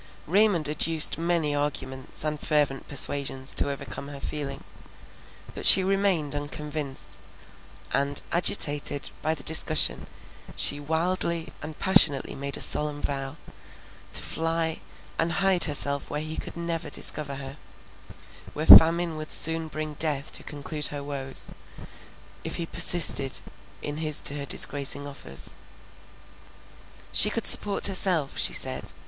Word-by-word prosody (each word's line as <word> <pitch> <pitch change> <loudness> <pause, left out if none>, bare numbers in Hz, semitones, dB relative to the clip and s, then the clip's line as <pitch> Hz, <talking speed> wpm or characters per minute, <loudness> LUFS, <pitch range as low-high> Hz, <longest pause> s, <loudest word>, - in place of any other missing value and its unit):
Raymond 185 -3 +2
adduced 155 +1 +3
many 165 -3 0
arguments 135 -3 -5
and 150 -1 -3
fervent 145 -4 0
persuasions 135 -1 0
to - - +1
overcome 140 -2 -7
her 140 -1 -9
feeling, 140 -1 -6 0.9
but - - -8
she 190 - +9
remained 190 -6 0
unconvinced; 145 -1 -4 0.8
and, 140 +1 0
agitated 145 -4 -1
by 160 +1 -1
the 140 - -8
discussion, 160 +3 0 0.5
she 145 - +4
wildly 165 +2 -2
and 155 0 -8
passionately 190 -8 +4
made 140 +1 -4
a - - -7
solemn 150 -1 -1
vow, 135 -1 -4 0.8
to - - +1
fly 165 0 -2 0.4
and 165 0 0
hide 195 -1 +3
herself 140 -1 -2
where 150 - -3
he 155 +1 -5 0.2
never 170 -1 -4
could - - -11
discover 140 -2 -3
her, 135 +1 -8 1.0
where 155 - -4
famine 165 0 +8
would 155 0 -6
soon 165 0 +5
bring 155 0 -6
death 150 -2 -1
to - - -3
conclude 150 +1 -5
her 145 -1 -7
woes, 135 -2 -6 0.9
if - - -4
he 170 - -3
persisted 155 -6 0 0.4
in 145 0 -4
his 155 -2 -3
to - - +1
her 140 - -6
disgracing 140 0 -1
offers. 140 - -10 1.6
She - - +5
could - - -2
support 205 -1 +6
herself, 185 -7 +1
she - - +1
said. - - -3
150 Hz, 130 wpm, -25 LUFS, 140-165 Hz, 1.6 s, she